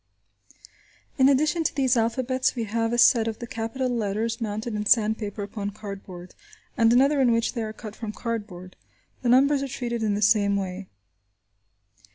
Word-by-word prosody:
In 265 Hz, +1 st, +6 dB
addition 300 Hz, +4 st, +2 dB
to -, -, -1 dB
these 265 Hz, -3 st, +2 dB
alphabets 255 Hz, +3 st, 0 dB
we 235 Hz, -, -2 dB
have 225 Hz, +1 st, -1 dB
a 240 Hz, -, 0 dB
set 230 Hz, -1 st, +5 dB
of 220 Hz, -1 st, -3 dB
the 240 Hz, -, -7 dB
capital 230 Hz, +3 st, -3 dB
letters 230 Hz, 0 st, -2 dB
mounted 220 Hz, +1 st, -3 dB
in 210 Hz, 0 st, -2 dB
sandpaper 215 Hz, -2 st, +1 dB
upon 200 Hz, 0 st, -5 dB
cardboard, 195 Hz, -3 st, -9 dB, 0.4 s
and 230 Hz, -3 st, +4 dB
another, 275 Hz, +4 st, +4 dB
in 250 Hz, -2 st, +4 dB
which 230 Hz, 0 st, 0 dB
they 235 Hz, -, -3 dB
are 215 Hz, -1 st, -4 dB
cut 215 Hz, -1 st, -10 dB
from 220 Hz, -3 st, -6 dB
cardboard. 205 Hz, -6 st, -6 dB, 0.5 s
The 245 Hz, -, 0 dB
numbers 275 Hz, +3 st, +4 dB
are 275 Hz, -, -2 dB
treated 240 Hz, -3 st, -4 dB
in 210 Hz, -2 st, 0 dB
the 205 Hz, -, -3 dB
same 200 Hz, 0 st, +3 dB
way. 190 Hz, -1 st, -4 dB
225 Hz, 175 wpm, -25 LUFS, 210-250 Hz, 0.5 s, In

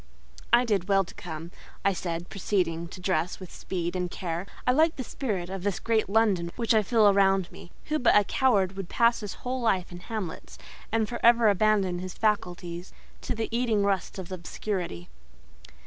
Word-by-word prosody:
"I 240 Hz, +1 st, +6 dB
did 205 Hz, -4 st, 0 dB
well 195 Hz, -1 st, +4 dB
to 185 Hz, -, -12 dB
come," 165 Hz, 0 st, -7 dB, 0.3 s
I 200 Hz, -, +4 dB
said, 170 Hz, -1 st, -4 dB
proceeding 175 Hz, -4 st, -1 dB
to 175 Hz, -, -10 dB
dress 180 Hz, -2 st, -1 dB
with 185 Hz, -2 st, -10 dB
speed 175 Hz, -1 st, -4 dB
and 180 Hz, -1 st, -1 dB
care. 175 Hz, +1 st, -4 dB, 0.2 s
"I 250 Hz, -, +4 dB
like 315 Hz, +5 st, +3 dB
the 260 Hz, -, -4 dB
spirit 205 Hz, -10 st, -3 dB
of 195 Hz, -1 st, -4 dB
this 200 Hz, 0 st, -1 dB
great 225 Hz, -3 st, +1 dB
London 200 Hz, -5 st, +2 dB
which 230 Hz, -1 st, +1 dB
I 220 Hz, -, +5 dB
feel 220 Hz, 0 st, +4 dB
around 195 Hz, -2 st, +3 dB
me. -, -, -12 dB, 0.2 s
Who 305 Hz, 0 st, +1 dB
but 245 Hz, -, +4 dB
a 210 Hz, -, +5 dB
coward 200 Hz, -5 st, +2 dB
would 195 Hz, -2 st, -6 dB
pass 235 Hz, 0 st, +3 dB
his 210 Hz, -3 st, -6 dB
whole 255 Hz, +1 st, -2 dB
life 190 Hz, -7 st, +1 dB
in 175 Hz, -, -8 dB
hamlets; 200 Hz, -4 st, -6 dB, 0.3 s
and 220 Hz, -1 st, +1 dB
for 240 Hz, -, -5 dB
ever 235 Hz, -1 st, +6 dB
abandon 200 Hz, -3 st, +2 dB
his 185 Hz, 0 st, -6 dB
faculties 180 Hz, -4 st, -2 dB, 0.3 s
to -, -, -3 dB
the 225 Hz, 0 st, -2 dB
eating 230 Hz, -4 st, +2 dB
rust 195 Hz, -1 st, -1 dB
of 190 Hz, -1 st, -7 dB
obscurity?" 175 Hz, -, -4 dB
195 Hz, 190 wpm, -27 LUFS, 180-220 Hz, 0.3 s, I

